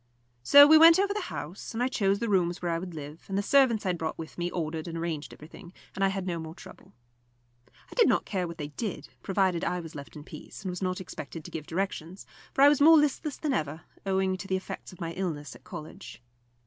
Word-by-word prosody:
So 285 - +9
we 310 +1 +8
went 330 +1 +9
over 400 +1 +1
the 420 - -2
house, 155 +7 -7
and 240 - 0
I - - +2
chose 200 -6 +1
the 235 - -2
rooms 180 -4 +1
where 175 -1 -2
I 165 - 0
would 180 -1 -7
live; 150 +1 -8
and 195 - -2
the 200 - 0
servants 250 -4 +3
I - - +1
had 175 -2 -1
brought 160 -1 -3
with 160 -1 -8
me 175 0 -2
ordered 160 -1 -4
and 165 0 -5
arranged 165 -3 -4
everything, 170 +4 -13 0.2
and 195 - -2
I - - +5
had 195 -1 -3
no 175 -2 -2
more 160 0 -8
trouble. - - -14 0.7
I - - -18
did 470 - +4
not - - +2
care 185 -3 -2
what 170 0 -8
they 145 -2 -5
did, 155 -2 -5
provided 190 -3 +1
I 180 - -1
was 165 -2 -9
left 140 -1 -10
in 150 - -9
peace, - - -11
and 185 - -3
was 180 - -6
not 185 0 -2
expected 160 -3 -8
to - - -9
give 155 -2 -6
directions; 185 0 -4 0.3
for 275 - +3
I - - +10
was 290 -1 +2
more 320 +2 +8
listless 295 0 0
than 300 -3 -1
ever, 155 - -2 0.2
owing 190 -1 0
to 195 - -8
the 190 - +1
effects 190 - -8
of 185 - -15
my 165 -1 -4
illness 160 -5 -4
at - - -16
college. 155 - -10
180 Hz, 250 wpm, -28 LUFS, 160-200 Hz, 0.7 s, I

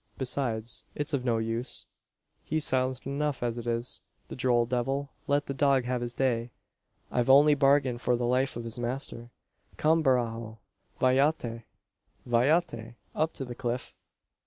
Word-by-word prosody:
"Besides, 120 -4 -1
it's 150 +1 -1
of 135 -3 0
no 120 -3 +1
use. 115 +2 -2 0.6
He's 155 -1 -1
silent 130 -1 0
enough 140 0 -2
as 120 0 -1
it 120 - -7
is, 120 +1 -1 0.3
the - - -6
droll 120 -2 +2
devil. 135 +3 -1 0.2
Let 145 0 +2
the 140 - -3
dog 135 -1 +3
have 125 0 -2
his 120 0 -3
day. 120 -3 0 0.6
I've 125 0 +1
only 145 +3 +7
bargained 135 -3 +3
for 125 - +2
the 120 0 -1
life 130 +2 +1
of 120 - -5
his 115 +1 -5
master. 120 -1 -3 0.5
Come, 160 +2 +3
Barajo! 115 -5 0 0.4
Vayate! 130 -3 +2 0.6
vayate! 120 -2 +1 0.2
Up 155 +1 0
to 135 - -4
the 125 - -6
cliff. 120 0 -3
125 Hz, 155 wpm, -29 LUFS, 120-140 Hz, 0.6 s, only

